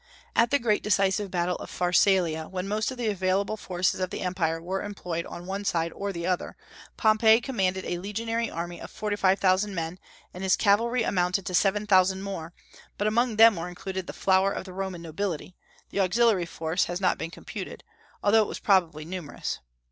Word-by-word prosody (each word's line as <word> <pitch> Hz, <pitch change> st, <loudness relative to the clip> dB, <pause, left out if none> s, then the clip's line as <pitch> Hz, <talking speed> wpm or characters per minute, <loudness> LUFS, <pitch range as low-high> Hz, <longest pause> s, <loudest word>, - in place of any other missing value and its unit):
At 230 Hz, 0 st, +4 dB
the 285 Hz, -, +4 dB
great 230 Hz, -5 st, +1 dB
decisive 200 Hz, -1 st, +1 dB
battle 180 Hz, -1 st, -1 dB
of -, -, -9 dB
Pharsalia, 175 Hz, -3 st, +2 dB
when 185 Hz, 0 st, -4 dB
most 215 Hz, +2 st, 0 dB
of 260 Hz, -, -6 dB
the 240 Hz, -, -3 dB
available 195 Hz, +1 st, 0 dB
forces 185 Hz, -3 st, -1 dB
of 185 Hz, -1 st, -1 dB
the -, -, -5 dB
empire 170 Hz, -3 st, -1 dB
were 185 Hz, +3 st, -3 dB
employed 180 Hz, -5 st, -4 dB
on 175 Hz, -, -8 dB
one 195 Hz, +2 st, -4 dB
side 170 Hz, -4 st, 0 dB
or 200 Hz, 0 st, -3 dB
the 170 Hz, -2 st, -5 dB
other, 180 Hz, -1 st, -2 dB, 0.4 s
Pompey 220 Hz, 0 st, +5 dB
commanded 190 Hz, -7 st, -1 dB
a 175 Hz, -, -2 dB
legionary 225 Hz, +4 st, -2 dB
army 170 Hz, +1 st, -5 dB
of -, -, -8 dB
forty 210 Hz, -1 st, -3 dB
five 195 Hz, -1 st, +3 dB
thousand 195 Hz, +1 st, +2 dB
men, 165 Hz, +2 st, -4 dB, 0.3 s
and 180 Hz, -, -8 dB
his 190 Hz, -1 st, +3 dB
cavalry 230 Hz, +3 st, +2 dB
amounted 180 Hz, -1 st, 0 dB
to 185 Hz, -, -4 dB
seven 205 Hz, +3 st, +2 dB
thousand 190 Hz, -1 st, +3 dB
more, 170 Hz, -5 st, -5 dB, 0.5 s
but 205 Hz, -, -1 dB
among 230 Hz, +2 st, +2 dB
them 225 Hz, 0 st, +7 dB
were 170 Hz, +1 st, -4 dB
included 185 Hz, +1 st, -5 dB
the -, -, -4 dB
flower 190 Hz, +1 st, +2 dB
of -, -, -4 dB
the 185 Hz, -, -9 dB
Roman 190 Hz, -2 st, -4 dB
nobility; 175 Hz, +1 st, -4 dB, 0.4 s
the -, -, -2 dB
auxiliary 195 Hz, -1 st, +3 dB
force 165 Hz, +2 st, -1 dB
has 175 Hz, +1 st, -3 dB
not 190 Hz, -, +1 dB
been 165 Hz, -, -3 dB
computed, 170 Hz, -, -8 dB, 0.4 s
although 220 Hz, +2 st, +5 dB
it 210 Hz, -, 0 dB
was -, -, -5 dB
probably 170 Hz, -6 st, +2 dB
numerous. 175 Hz, -3 st, -5 dB
190 Hz, 195 wpm, -27 LUFS, 175-205 Hz, 0.5 s, them